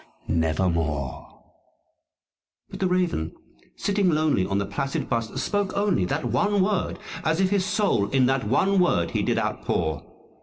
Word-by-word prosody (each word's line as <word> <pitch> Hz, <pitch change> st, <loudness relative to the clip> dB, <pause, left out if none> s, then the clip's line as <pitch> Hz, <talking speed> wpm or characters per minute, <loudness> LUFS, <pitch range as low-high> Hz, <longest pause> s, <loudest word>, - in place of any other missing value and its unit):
┬╗_ 80 Hz, -4 st, -1 dB, 1.4 s
But -, -, -7 dB
the 190 Hz, -, +2 dB
Raven, 180 Hz, -, 0 dB, 0.4 s
sitting 200 Hz, -2 st, +1 dB
lonely 155 Hz, -, +2 dB
on 95 Hz, -, 0 dB
that 100 Hz, 0 st, -2 dB
placid 135 Hz, +4 st, -2 dB
bust, 115 Hz, -1 st, -2 dB
spoke 205 Hz, -2 st, -1 dB
only 200 Hz, -, +2 dB
That 145 Hz, -, -2 dB
one 190 Hz, -, +2 dB
word, 195 Hz, -1 st, -1 dB, 0.3 s
as 160 Hz, +2 st, +1 dB
if 190 Hz, 0 st, +2 dB
his 200 Hz, -2 st, +2 dB
soul 200 Hz, -, +1 dB
in 135 Hz, -2 st, +3 dB
that 135 Hz, 0 st, +1 dB
one 190 Hz, -, +3 dB
word 85 Hz, -, +2 dB
he -, -, 0 dB
did -, -, 0 dB
outpour. 80 Hz, -3 st, -1 dB
135 Hz, 150 wpm, -25 LUFS, -, 1.4 s, in